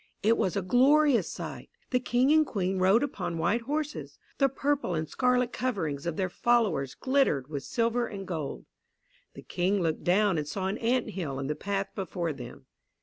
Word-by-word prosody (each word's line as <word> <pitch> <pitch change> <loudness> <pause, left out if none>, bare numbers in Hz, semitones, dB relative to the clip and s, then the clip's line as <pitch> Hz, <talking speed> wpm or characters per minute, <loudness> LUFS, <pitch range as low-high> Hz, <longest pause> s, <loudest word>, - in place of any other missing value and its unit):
It 225 +2 +4
was 185 - 0
a 200 - -1
glorious 270 +5 +4
sight. - - -7 0.2
The 250 - +3
King 250 +2 +2
and 310 0 +6
Queen 190 -8 -2
rode 195 +7 +4
upon 180 -11 -3
white 175 +9 +1
horses. 300 +4 -4 0.2
The 275 -1 +4
purple 275 -8 -1
and 160 0 -2
scarlet 250 - +1
coverings 170 - -2
of 170 - -2
their 190 - +1
followers 195 - +1
glittered 260 - +1
with 145 -3 -4
silver 235 - 0
and 195 -2 -7
gold. 150 - -4 0.7
The - - -10
King 190 +3 0
looked 165 -3 -1
down 190 -1 +3
and 150 - -4
saw 190 +4 -3
an 195 +4 -2
ant 240 0 0
hill 160 -9 -4
in 135 - -3
the 150 +2 -2
path 195 +1 -2
before 180 -4 -3
them. 130 0 -10
195 Hz, 185 wpm, -28 LUFS, 170-250 Hz, 0.7 s, and